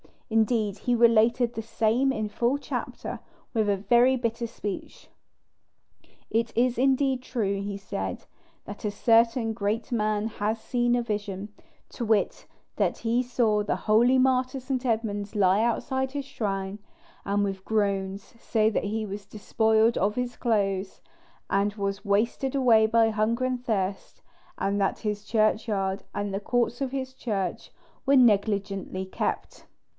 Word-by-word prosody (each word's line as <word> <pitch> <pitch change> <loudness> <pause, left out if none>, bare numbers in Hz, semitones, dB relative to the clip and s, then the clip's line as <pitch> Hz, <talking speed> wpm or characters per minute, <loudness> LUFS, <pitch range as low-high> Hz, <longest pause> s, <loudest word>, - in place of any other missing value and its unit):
Indeed, 220 -2 +1
he 245 -1 +1
related 235 +1 +4
the 225 - -4
same 230 +4 +1
in 215 -2 -2
full 240 +6 0
chapter, - - -5 0.3
with 220 -3 +1
a 200 - +3
very 240 +6 +4
bitter 235 -1 -2
speech. 205 -3 -7 1.2
"It 230 0 0
is 245 0 +2
indeed 265 0 +2
true," 200 -6 -2
he 200 0 -4
said, 95 - -5 0.4
"that 205 +2 -8
a - - +1
certain 230 +2 +3
great 215 +3 -2
man 215 -2 0
has 220 0 -2
seen 240 +1 +1
a 240 - 0
vision, 205 -2 -4 0.4
to 235 - -5
wit, 215 -2 0 0.3
that - - 0
he 235 +2 +1
saw 235 -4 +1
the 205 - -1
holy 235 +4 +3
martyr 255 0 +2
St. 260 0 -3
Edmund 215 -3 -2
lie 195 0 +4
outside 265 +3 -1
his 285 -1 -3
shrine, 200 -6 -3 0.5
and 205 +1 +1
with 195 -1 -3
groans 200 -2 0 0.2
say 220 -2 +2
that 215 - -1
he 215 +2 -2
was 200 0 -7
despoiled 220 +2 +2
of 205 +3 +1
his 250 -1 -2
clothes, 195 -4 -1 0.5
and 200 +1 +1
was 200 0 -3
wasted 230 +6 0
away 230 -5 +5
by 225 0 +4
hunger 220 +3 0
and 255 -1 -2
thirst; 195 -4 -2 0.4
and 200 +1 0
that 195 - 0
his 210 -1 -3
churchyard 215 -3 0
and 205 -1 -2
the 195 - -1
courts 240 +2 0
of 265 -2 -1
his 260 -1 -4
church 200 -8 -3 0.3
were 280 0 +4
negligently 200 -5 +2
kept." 190 - -4
220 Hz, 150 wpm, -26 LUFS, 205-240 Hz, 1.2 s, away